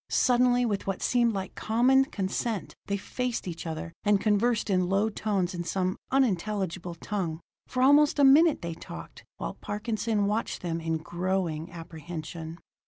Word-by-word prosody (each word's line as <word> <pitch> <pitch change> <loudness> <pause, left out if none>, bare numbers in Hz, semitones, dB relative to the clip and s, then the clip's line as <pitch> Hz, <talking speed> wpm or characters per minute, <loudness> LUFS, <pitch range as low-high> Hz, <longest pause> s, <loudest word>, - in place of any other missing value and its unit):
Suddenly, 245 -1 +3
with 205 -4 -2
what 195 -2 -2
seemed 240 -2 +3
like 190 -1 -4
common 255 +5 +3
consent, 205 0 -3
they 200 - 0
faced 245 +2 -3
each 170 -1 -5
other, 160 +1 -5
and 205 -1 +4
conversed 215 +1 +1
in 185 -1 +2
low 200 +3 +2
tones 200 -4 -1
in 175 -1 -3
some 185 +1 -1
unintelligible 190 -8 0
tongue. 170 -3 -3 0.3
For 255 0 0
almost 290 +2 +5
a 285 - +4
minute 295 - +6
they 170 -1 -3
talked, 80 - -10
while - - -4
Parkinson 215 0 -1
watched 210 0 -2
them 165 -1 -2
in 165 0 -1
growing 175 0 -2
apprehension. 165 0 -7
195 Hz, 155 wpm, -28 LUFS, 170-230 Hz, 0.3 s, minute